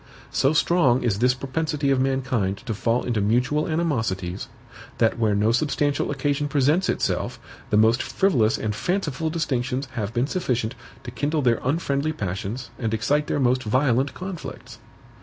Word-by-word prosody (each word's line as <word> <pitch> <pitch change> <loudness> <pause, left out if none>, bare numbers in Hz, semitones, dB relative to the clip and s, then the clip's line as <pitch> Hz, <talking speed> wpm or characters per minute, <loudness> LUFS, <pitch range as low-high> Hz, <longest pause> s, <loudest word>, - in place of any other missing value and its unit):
So 135 - +2
strong 155 -6 +3
is 105 -5 0
this 125 +2 +3
propensity 140 +2 -1
of 130 -1 +2
mankind 130 -7 0
to 115 - -2
fall 115 +3 0
into 115 -4 0
mutual 125 +8 +1
animosities, 110 - -1 0.5
that 115 +1 +2
where 110 -3 +2
no 105 +2 +3
substantial 145 +2 0
occasion 145 +1 0
presents 145 +6 +2
itself, - - -1 0.3
the 105 - +3
most 115 +3 +4
frivolous 125 - +2
and 105 -1 -2
fanciful 160 - -1
distinctions 135 -5 -1
have 105 -2 -3
been 120 +2 +1
sufficient 125 -9 -1 0.3
to - - -7
kindle 150 0 -1
their 120 -2 +3
unfriendly 145 +1 0
passions 100 - -4
and 110 -3 -1
excite 145 +7 +1
their - - 0
most 130 -1 +2
violent 130 +3 +1
conflicts. 185 -2 -7
130 Hz, 155 wpm, -24 LUFS, 115-150 Hz, 0.5 s, most